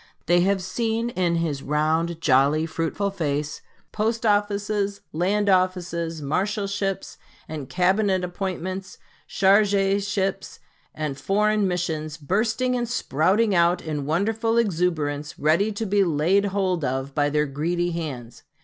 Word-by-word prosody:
They 175 0 +4
have 190 +1 +1
seen 230 +4 -1
in 180 -5 0
his 160 -5 -1
round, 160 +3 0
jolly, 145 +2 +3
fruitful 165 +5 -2
face 150 -5 -2 0.3
post 225 +2 -1
offices, 205 -1 0
land 200 +6 +1
offices, 175 -4 0
marshalships, 200 +4 -2 0.3
and 150 -4 -6
cabinet 190 +1 +2
appointments, 185 +1 -4 0.3
chargé 200 0 +3
ships 195 -1 -2 0.4
and 150 -3 -4
foreign 210 0 +2
missions, 160 -4 -2
bursting 220 - 0
and 240 -2 -2
sprouting 205 - +1
out 175 0 +3
in 150 -3 -4
wonderful 225 +7 0
exuberance 160 -8 0
ready 165 +8 +2
to 220 +2 -3
be 200 0 +3
laid 175 +4 +2
hold 190 -4 0
of 135 +1 -2
by 145 0 +1
their 150 0 +1
greedy 170 +5 -1
hands. 130 -8 -6
185 Hz, 125 wpm, -24 LUFS, 155-200 Hz, 0.4 s, They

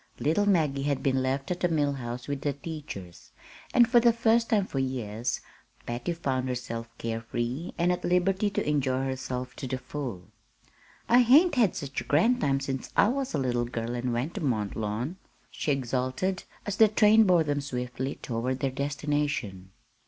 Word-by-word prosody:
Little 165 +8 +2
Maggie 155 -8 +2
had 140 -1 -1
been 130 -1 +2
left 135 +4 -1
at 180 - -2
the 180 - +2
Mill 145 -3 +1
House 120 -2 -6
with 140 -1 -3
the 145 0 0
teachers, 140 - -8 0.4
and 240 -2 +6
for 240 0 +5
the 235 0 +5
first 230 0 +2
time 205 -4 +3
for 135 - -3
years 120 -3 -2 0.4
Patty 120 +7 -3
found 130 -6 -2
herself 115 -2 -4
care 115 0 -3
free, 120 +8 -4
and 175 +1 +2
at 180 - -2
liberty 190 +3 +2
to 195 - -2
enjoy 135 -3 +1
herself 130 -1 -4
to 130 - -5
the 130 - -2
full. 125 -8 -6 0.8
"I 240 - +6
hain't 290 +9 +6
had 230 -8 +3
sech 140 -1 -4
a - - -10
grand 230 +12 +3
time 135 -1 +2
since 135 -1 -4
I 205 - +6
was 265 -5 -2
a - - +1
little 120 -3 0
girl 120 0 -4
an' 125 +1 -2
went 125 +8 -2
ter - - -5
Mont 110 -9 -1
Lawn," 110 - -3 0.3
she 150 - -1
exulted, 130 +8 -1 0.2
as 205 -1 -3
the 220 - +7
train 215 +1 +5
bore 180 -4 +4
them 145 -1 -1
swiftly 125 0 -4
toward 125 +2 -2
their 135 0 0
destination. 140 -8 -2
140 Hz, 185 wpm, -28 LUFS, 125-175 Hz, 0.8 s, the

